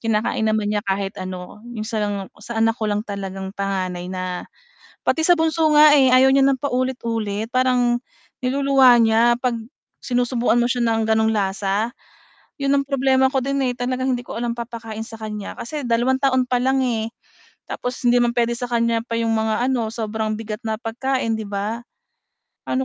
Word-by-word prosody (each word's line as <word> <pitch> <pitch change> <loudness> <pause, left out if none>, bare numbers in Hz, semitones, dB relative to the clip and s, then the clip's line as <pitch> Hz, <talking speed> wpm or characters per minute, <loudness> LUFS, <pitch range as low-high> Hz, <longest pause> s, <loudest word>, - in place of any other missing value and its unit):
kinakain 220 0 0
naman 215 -1 0
niya 210 - 0
kahit 195 0 -2
ano, 185 +2 -7 0.2
yung 215 - -3
sa 220 -1 -2 0.4
sa 235 +1 -6
anak 225 0 +3
ko 215 - 0
lang 205 +1 -1
talagang 195 -1 -5
panganay 185 -3 -3
na 185 -1 -4 0.6
pati 320 - +2
sa 350 - +6
bunso 320 -1 +2
nga 300 -1 +8
eh, 265 -2 +5
ayaw 260 +1 +6
niya 275 - +5
ng 270 -1 +3
paulit-ulit 230 -6 -2
parang 250 -1 +2 0.4
niluluwa 265 -1 +5
niya, 230 +1 +4
'pag 245 -1 0 0.5
sinusubuan 245 -1 +1
mo 240 - +3
siya 245 0 0
ng 225 -1 +1
ganong 220 0 +2
lasa? 200 +2 -1 0.7
Yun 275 0 +2
ang - - -7
problema 265 -1 +2
ko 265 -1 0
din 275 +2 -1
eh, 250 - 0
talagang 255 +1 -1
hindi 245 - -2
ko 230 - -6
alam 235 0 -1
papakain 230 -2 -6
sa 225 0 -10
kanya 210 -2 -5
kasi 295 +5 -5
2 240 +2 +2
taon 260 -2 +2
pa 250 - +2
lang 265 +1 +2
eh, 225 -2 -1 0.6
tapos 250 0 -4
hindi 240 0 +5
man 240 0 +1
pwede 235 0 +2
sa 245 - -3
kanya 235 -1 +1
pa 230 - -6
yung 230 0 0
mga 220 +1 0
ano, 235 -4 0
sobrang 220 -1 -2
bigat 215 -1 -5
na 220 0 -1
pagkain 245 0 -1
di 220 - -5
ba? 210 +4 -3 0.9
Paano 260 +1 0
235 Hz, 180 wpm, -21 LUFS, 215-255 Hz, 0.9 s, nga